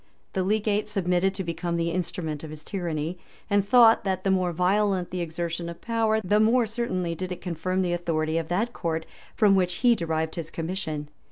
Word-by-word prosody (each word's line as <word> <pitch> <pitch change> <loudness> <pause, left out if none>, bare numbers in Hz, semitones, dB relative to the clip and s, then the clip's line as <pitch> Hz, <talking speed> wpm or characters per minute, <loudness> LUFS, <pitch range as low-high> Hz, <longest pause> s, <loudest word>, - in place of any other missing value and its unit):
The 190 - 0
legate 210 +1 +1
submitted 190 -2 +1
to 190 - -2
become 170 0 -2
the 170 0 0
instrument 165 -3 -3
of 160 - -6
his 155 0 -8
tyranny; 170 -3 -3 0.3
and 205 -1 +4
thought, 230 +2 +6
that 190 -2 -1
the 195 - +2
more 185 -2 +2
violent 185 +1 +1
the 180 -1 -2
exertion 170 0 -3
of 170 - -8
power, 225 -1 +1
the 205 +2 +2
more 230 +3 +4
certainly 210 -7 -2
did 185 +2 -5
it 180 - -4
confirm 185 +2 -1
the 175 -1 0
authority 165 -2 0
of 165 - -5
that 210 +8 0
court 160 -1 -2 0.3
from 210 -3 +5
which 180 -2 +2
he 240 - +7
derived 160 -5 -1
his 165 -2 -4
commission. 160 -3 -4
180 Hz, 195 wpm, -26 LUFS, 165-200 Hz, 0.3 s, he